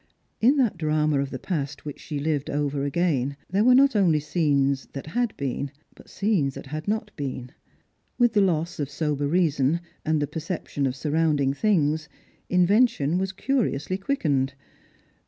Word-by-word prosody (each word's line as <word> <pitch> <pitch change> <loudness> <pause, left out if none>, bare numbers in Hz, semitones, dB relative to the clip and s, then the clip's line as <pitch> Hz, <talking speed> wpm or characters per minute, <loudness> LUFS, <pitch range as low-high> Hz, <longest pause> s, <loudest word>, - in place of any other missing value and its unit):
In 260 +6 +4
that 235 -10 +1
drama 155 -2 +1
of 140 0 -1
the 130 - -5
past 150 -3 -4
which 145 - -6
she 150 - -5
lived 145 -1 -1
over 145 -1 -1
again, 140 -3 0
there 200 +3 +3
were 250 +1 +6
not 275 -1 +5
only 175 -7 +4
scenes 140 -4 +1
that 135 - -6
had 235 +8 -1
been, 140 0 -2 0.2
but - - -17
scenes 185 -10 0
that - - -8
had 155 +5 -6
not 210 0 -1
been. 130 -3 -5 0.7
With 240 -2 +3
the 210 - +4
loss 170 -3 0
of 145 -2 -2
sober 145 -1 -1
reason 155 -2 +2 0.2
and 155 0 +1
the 145 - +1
perception 150 -2 -3
of 130 - -3
surrounding 150 -1 +1
things, 155 -4 +1 0.4
invention 180 - +3
was 190 0 -1
curiouly 190 - -1
quickened. 145 - 0
155 Hz, 160 wpm, -25 LUFS, 140-190 Hz, 0.7 s, were